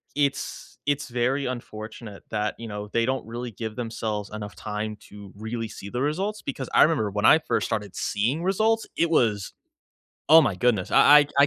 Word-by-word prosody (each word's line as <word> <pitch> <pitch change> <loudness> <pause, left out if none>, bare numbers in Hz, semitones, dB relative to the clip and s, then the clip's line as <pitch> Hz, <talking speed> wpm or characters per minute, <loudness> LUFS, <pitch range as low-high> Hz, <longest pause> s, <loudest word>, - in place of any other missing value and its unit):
it's 140 -1 -2
it's 145 0 0
very 125 +3 0
unfortunate 110 -3 -7
that, 105 -1 -1
you 115 - -6
know, 105 0 -6
they 115 0 +2
don't 130 -2 -1
really 120 +1 -5
give 110 +1 -6
themselves 110 -3 -3
enough 105 -1 -6
time 105 0 -4
to 100 -2 -12
really 110 +2 -4
see 100 -1 -9
the 125 +4 -3
results, 190 +9 -1
because 135 -1 -5
I - - +7
remember 150 -10 +2
when 105 +1 -1
I 160 - +8
first 160 - -1
started 105 -4 -3
seeing 125 +11 -1
results, 220 +4 +2
it 170 0 +2
was 105 - +1 0.8
oh 160 +1 +10
my 110 -8 +1
goodness, 110 -4 +1
I - - +1 0.2
I 145 - +1 0.2
I - - +7
115 Hz, 190 wpm, -25 LUFS, 105-140 Hz, 0.8 s, oh